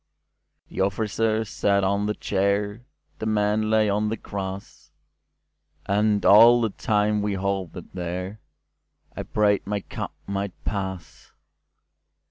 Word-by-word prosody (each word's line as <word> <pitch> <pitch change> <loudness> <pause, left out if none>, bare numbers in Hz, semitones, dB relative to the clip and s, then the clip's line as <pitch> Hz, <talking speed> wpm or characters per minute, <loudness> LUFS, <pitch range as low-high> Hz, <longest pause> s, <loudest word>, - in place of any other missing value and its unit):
The - - -3
officer 110 +3 0
sat 100 -1 +1
on 100 +2 +1
the 105 - -1
chair, 100 +2 -1 0.4
The 110 - -3
men 105 0 +1
lay 110 -1 +3
on 105 +1 0
the 110 - -2
grass, 95 -1 -7 1.0
And 105 +1 +1
all 115 +4 +8
the 115 -3 0
time 105 -1 +1
we 100 -1 -1
halted 95 -3 -4
thereI 90 +3 -4 0.9
prayed 105 -2 +2
my 105 0 -2
cup - - -7
might 100 -1 -3
pass. 95 -6 -5
100 Hz, 115 wpm, -24 LUFS, 100-105 Hz, 1.0 s, all